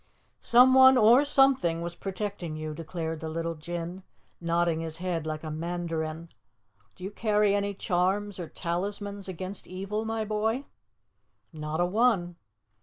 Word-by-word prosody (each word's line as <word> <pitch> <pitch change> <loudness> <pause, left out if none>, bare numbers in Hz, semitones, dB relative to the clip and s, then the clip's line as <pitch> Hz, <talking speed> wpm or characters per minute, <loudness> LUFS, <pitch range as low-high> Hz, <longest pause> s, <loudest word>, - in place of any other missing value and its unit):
"Someone 260 +2 +7
or 240 +4 +6
something 270 - +3
was 170 0 -4
protecting 195 -3 -5
you," 155 0 -4
declared 160 0 -5
the 160 - -5
little 165 +1 -2
Jinn, 170 +3 -6 0.4
nodding 170 -1 +1
his 165 -1 -5
head 170 -3 -3
like 155 0 -4
a 155 - -5
mandarin. 165 0 -4 0.7
"Do - - -13
you 195 - -4
carry 210 -1 +2
any 200 0 -1
charms 190 +1 0
or 170 - -5
talismans 200 +3 -4
against 185 +1 -6
evil, 195 +4 -4
my 225 0 -2
boy?" 220 +5 -1 0.9
"Not 155 0 -4
a 175 - +3
one." 185 -4 +1
180 Hz, 140 wpm, -28 LUFS, 165-210 Hz, 0.9 s, Someone